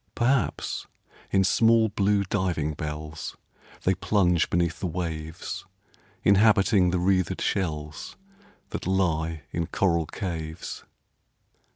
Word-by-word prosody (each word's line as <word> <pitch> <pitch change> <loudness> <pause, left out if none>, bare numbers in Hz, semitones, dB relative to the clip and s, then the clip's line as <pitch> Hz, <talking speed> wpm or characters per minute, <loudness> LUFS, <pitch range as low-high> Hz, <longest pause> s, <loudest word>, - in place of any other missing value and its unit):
Perhaps, 130 +1 0 0.4
in 95 0 +3
small, 115 +3 +4
blue 100 -1 +2
diving 90 -6 -1
bells 75 +1 -6 0.5
They 95 - +3
plunge 90 -2 +2
beneath 85 -1 0
the 95 - -1
waves, 80 -1 -4 0.6
Inhabiting 100 -2 +5
the 90 - +1
wreathed 95 -1 +1
shells 75 -5 -2 0.6
That - - -4
lie 80 -4 0
in 85 -1 -2
coral 85 -4 +1
caves. 80 -3 -5
90 Hz, 100 wpm, -26 LUFS, 80-100 Hz, 0.6 s, Inhabiting